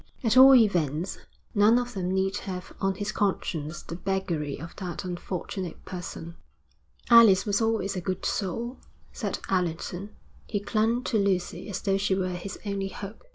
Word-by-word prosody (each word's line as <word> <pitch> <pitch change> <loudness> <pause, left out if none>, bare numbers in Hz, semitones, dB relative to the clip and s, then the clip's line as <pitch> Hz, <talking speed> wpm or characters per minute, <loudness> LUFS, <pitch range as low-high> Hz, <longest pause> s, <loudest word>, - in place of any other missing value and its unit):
At 225 -2 +2
all 265 +1 +10
events 175 - +2 0.3
none 210 +3 +5
of 245 0 -2
them 185 -3 -2
need 190 +1 +1
have 180 -3 -6
on 195 0 +1
his 205 +1 -3
conscience 170 -5 -2
the 165 - -7
beggary 175 -7 -2
of 165 +3 -9
that 180 -2 -5
unfortunate 180 0 -5
person. 170 -2 -7 0.7
'Alice 225 -5 +8
was 205 +1 +1
always 225 -3 0
a 185 - -2
good 185 +1 -3
soul,' 230 +6 -2 0.3
said - - -3
Allerton. 180 +1 -1 0.4
He 205 - -1
clung 220 +4 +1
to 225 -4 +1
Lucy 185 -1 -1
as 190 -2 -4
though 195 -1 +1
she 195 -1 +1
were 185 -1 -1
his 185 +3 -6
only 200 -1 -2
hope. 200 - -8
195 Hz, 160 wpm, -27 LUFS, 180-210 Hz, 0.7 s, all